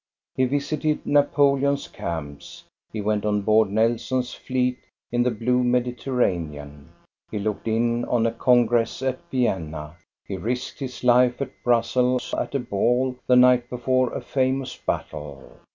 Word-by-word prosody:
He 130 - +2
visited 145 +3 -1
Napoleon's 140 -1 +2
camps, 75 -4 -7 0.3
he 110 - -4
went 105 0 0
on 105 -1 +1
board 110 0 +4
Nelson's 120 +4 0
fleet 125 -1 -1 0.3
in 120 0 +1
the 125 - +3
blue 125 +2 0
Mediterranean, 100 - -1 0.4
he 110 - -4
looked 105 +1 -3
in 115 +1 +1
on 115 -2 +1
a 115 - +2
congress 120 0 +2
at 130 -1 -1
Vienna, 80 - -2 0.3
he 95 - -5
risked 120 +7 -4
his 130 -3 -6
life 125 0 +4
at 140 - -3
Brussels 125 +1 +1
at - - -2
a - - +2
ball 125 +3 0
the 125 - +5
night 125 -1 +5
before 130 +1 0
a - - -4
famous 130 0 -1
battle. 75 -3 -6
120 Hz, 140 wpm, -24 LUFS, 105-130 Hz, 0.4 s, the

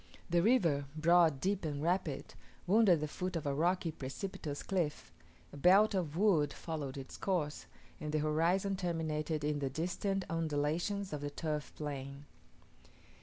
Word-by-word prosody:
The 170 0 +4
river, 170 - +3
broad, 165 -2 +4
deep, 195 +3 0
and 150 -3 -2
rapid, 165 -3 -1 0.3
wound 210 +3 +5
at 170 -4 +5
the 155 - -1
foot 180 +4 -4
of 165 - -3
a 140 - 0
rocky 170 +3 +1
precipitous 145 +1 -5
cliff: 175 -6 -2 0.4
a - - -8
belt 195 +8 +6
of 170 -5 -1
wood 175 -8 +3
followed 145 -5 -5
its 135 -1 -8
course, 165 -6 -2 0.3
and 150 -1 -4
the 155 - +1
horizon 170 +6 +1
terminated 160 -4 -2
in 150 0 0
the 140 -1 -1
distant 180 +6 -2
undulations 165 +5 -1
of 150 - -3
the 145 - -3
turf 150 0 -3
plain. 140 -1 -6
160 Hz, 155 wpm, -34 LUFS, 145-185 Hz, 0.4 s, belt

